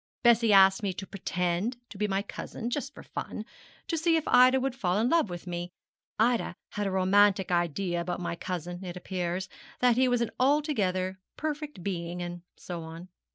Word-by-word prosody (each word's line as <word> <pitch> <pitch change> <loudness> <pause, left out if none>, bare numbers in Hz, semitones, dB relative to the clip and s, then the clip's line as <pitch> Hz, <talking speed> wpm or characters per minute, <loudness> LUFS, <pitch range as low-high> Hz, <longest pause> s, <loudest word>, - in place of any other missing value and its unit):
Bessie 230 -2 +5
asked 195 0 +7
me 200 -3 -1
to 190 - -6
pretend 185 +3 -2
to 205 - -9
be 210 - +1
my 195 0 0
cousin, 230 +3 -6
just 275 +1 -2
for - - -10
fun, - - -6 0.4
to 335 - -1
see 330 +1 +2
if 320 -2 0
Ida 255 +1 +6
would 265 0 -1
fall 190 -7 0
in 230 +3 +2
love 330 - +3
with 175 0 -7
me. 175 0 -4 0.5
Ida 235 +2 +2
had 205 -1 -2
a - - -1
romantic 190 0 +4
idea 175 +1 0
about 175 +1 -3
my 175 -1 -3
cousin, 175 +1 -5
it 180 -1 -6
appears, 180 0 -3 0.3
that 245 -1 +4
he 260 0 +4
was 245 -1 +2
an 235 - -1
altogether 210 - +1 0.2
perfect 300 - -4
being, 175 -2 -3
and 175 0 -5 0.2
so 175 -2 -6
on. 165 +3 -9
195 Hz, 190 wpm, -29 LUFS, 175-245 Hz, 0.5 s, asked